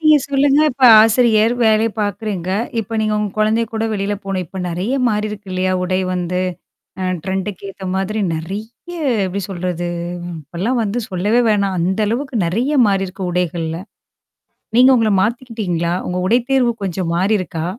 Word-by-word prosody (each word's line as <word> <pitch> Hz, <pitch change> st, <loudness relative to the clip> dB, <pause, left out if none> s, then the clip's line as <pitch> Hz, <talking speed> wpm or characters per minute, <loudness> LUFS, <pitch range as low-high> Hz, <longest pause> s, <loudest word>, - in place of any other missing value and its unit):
நீங்க 310 Hz, -1 st, +6 dB
சொல்லுங்க. 280 Hz, +1 st, +3 dB
இப்ப 260 Hz, +1 st, 0 dB, 0.2 s
ஆசிரியர், 225 Hz, 0 st, +4 dB
வேலை 220 Hz, 0 st, +4 dB
பார்க்குறீங்க. 200 Hz, -3 st, -3 dB, 0.3 s
இப்ப 225 Hz, +1 st, -5 dB
நீங்க 215 Hz, 0 st, 0 dB
உங்க 210 Hz, -1 st, -1 dB
குழந்தை 215 Hz, +2 st, +2 dB
கூட 220 Hz, 0 st, -1 dB
வெளில 200 Hz, 0 st, -1 dB
போணும். 190 Hz, -2 st, -2 dB
இப்ப 190 Hz, -, -8 dB
நிறைய 180 Hz, +8 st, -2 dB, 0.2 s
மாறிருக்கு 210 Hz, -2 st, -3 dB
இல்லையா? 185 Hz, 0 st, 0 dB
உடை 185 Hz, +1 st, 0 dB
வந்து. 180 Hz, 0 st, -2 dB, 0.6 s
அ -, -, -1 dB, 0.2 s
ட்ரெண்டுக்கு 190 Hz, 0 st, -3 dB
ஏத்த 190 Hz, 0 st, -10 dB
மாதிரி 195 Hz, +3 st, -1 dB, 0.2 s
நிறைய 195 Hz, +7 st, -5 dB, 0.6 s
எப்படி 195 Hz, +2 st, -3 dB
சொல்றது? 175 Hz, -2 st, -3 dB, 0.5 s
இப்பல்லாம் 190 Hz, -, -2 dB
வந்து 215 Hz, +2 st, -2 dB
சொல்லவே 205 Hz, +6 st, +1 dB
வேணாம். 200 Hz, -2 st, +1 dB
அந்த 190 Hz, +5 st, 0 dB
அளவுக்கு 255 Hz, +2 st, -2 dB
நிறைய 235 Hz, -, 0 dB
மாறியிருக்கு 195 Hz, -1 st, -1 dB
உடைகள்ல. 170 Hz, -2 st, -2 dB, 1.0 s
நீங்க 255 Hz, +1 st, +7 dB
உங்கள 225 Hz, -3 st, +2 dB
மாத்திக்கிட்டீங்களா? 210 Hz, -7 st, -1 dB
உங்க 180 Hz, -, -2 dB
உடை 230 Hz, +6 st, +4 dB
தேர்வு 260 Hz, -3 st, +3 dB
கொஞ்சம் 180 Hz, -2 st, -2 dB
மாறிருக்கா? 180 Hz, -4 st, 0 dB
200 Hz, 145 wpm, -18 LUFS, 185-225 Hz, 1.0 s, நீங்க